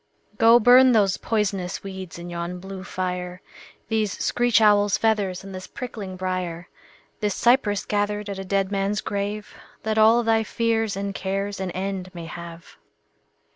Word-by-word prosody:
Go 230 +1 +7
burn 250 +2 +7
those 200 -4 +3
poisonous 195 -5 -2
weeds 190 -3 -7
in 175 0 -8
yon 170 +1 -4
blue 190 0 -8
fire, 180 -1 -4 0.4
These 215 -3 0
screech 240 -3 +2
owl's 205 -2 +4
feathers 205 -4 0
and 195 0 -9
this 185 0 -7
prickling 215 -7 -7
briar, 180 -2 -3 0.5
This 210 -3 -1
cypress 235 -5 +2
gathered 210 0 -1
at 200 -1 -5
a - - -4
dead 195 0 0
man's 200 +1 0
grave, 205 +1 -4 0.3
That 220 0 0
all 225 +2 +6
thy 225 -1 +2
fears 225 -2 0
and 200 0 -3
cares 195 +1 -3
an 190 -1 -3
end 185 0 -4
may 170 -1 -6
have. 170 0 -10
200 Hz, 155 wpm, -24 LUFS, 185-215 Hz, 0.5 s, Go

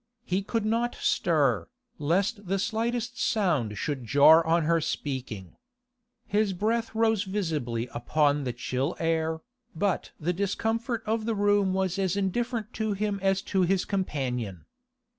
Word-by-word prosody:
He 190 -3 0
could 220 +2 -2
not 230 +2 0
stir, 145 -9 +1 0.3
lest 195 +7 0
the 195 +2 +1
slightest 235 +4 -2
sound 155 - +1
should 140 -4 -3
jar 145 +8 +6
on 165 0 +3
her 165 +1 +2
speaking. 125 - -4 0.7
His 205 -1 +1
breath 225 +5 -1
rose 220 -2 +3
visibly 155 - -2
upon 145 +4 +1
the 125 - -1
chill 130 +5 -2
air, 160 -1 0 0.3
but 195 +3 0
the 175 +3 0
discomfort 225 +5 -1
of 220 0 -1
the 225 -1 0
room 205 -2 +2
was 190 0 0
as 190 0 0
indifferent 220 +3 -1
to 220 -1 -1
him 205 0 -1
as 195 0 +1
to 190 - +4
his 185 +1 +2
companion. 125 - -3
190 Hz, 140 wpm, -27 LUFS, 150-215 Hz, 0.7 s, jar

